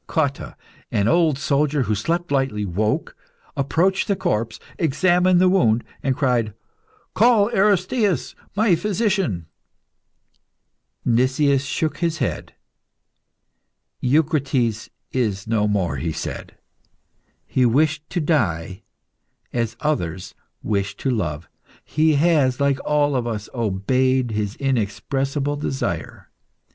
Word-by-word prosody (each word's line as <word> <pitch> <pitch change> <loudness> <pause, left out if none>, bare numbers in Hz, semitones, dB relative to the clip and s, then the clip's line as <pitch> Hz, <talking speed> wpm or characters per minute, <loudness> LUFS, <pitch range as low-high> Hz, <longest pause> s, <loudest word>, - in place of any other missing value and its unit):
Cotta, 140 - -1 0.4
an 100 0 +1
old 165 -1 +3
soldier, 145 0 +1
who 110 -2 -1
slept 165 +11 -1
lightly, 135 -7 0
woke, 105 +4 -1 0.4
approached 170 +7 +1
the 200 - +1
corpse, 115 - -2 0.2
examined 180 +3 +3
the 185 - +5
wound, 120 - +3 0.2
and 135 -1 0
cried 120 -6 +1 0.6
"Call 220 -1 +4
Aristaeus, 200 - +1 0.2
my 210 -2 +3
physician!" 190 - 0 1.6
Nicias 130 +3 +2
shook 155 +2 -2
his 170 -2 0
head. - - -3 1.5
"Eucrites 135 - +1 0.2
is 105 -7 -1
no 110 -2 +1
more," 100 -5 0
he 80 - -2
said. - - -6 0.9
"He 130 - +1
wished 150 +5 +2
to 180 - -2
die 95 - 0 0.7
as 115 -2 -2
others 90 - -2 0.3
wish 100 -1 -1
to 135 - -1
love. 85 - -2 0.4
He 155 0 +2
has, 145 -5 +3
like 140 -1 +2
all 145 -1 +1
of 120 -2 -1
us, 105 -3 -4
obeyed 125 +4 +1
his 105 0 -2
inexpressible 135 +3 -1
desire. 135 -2 -4
135 Hz, 110 wpm, -22 LUFS, 110-160 Hz, 1.6 s, the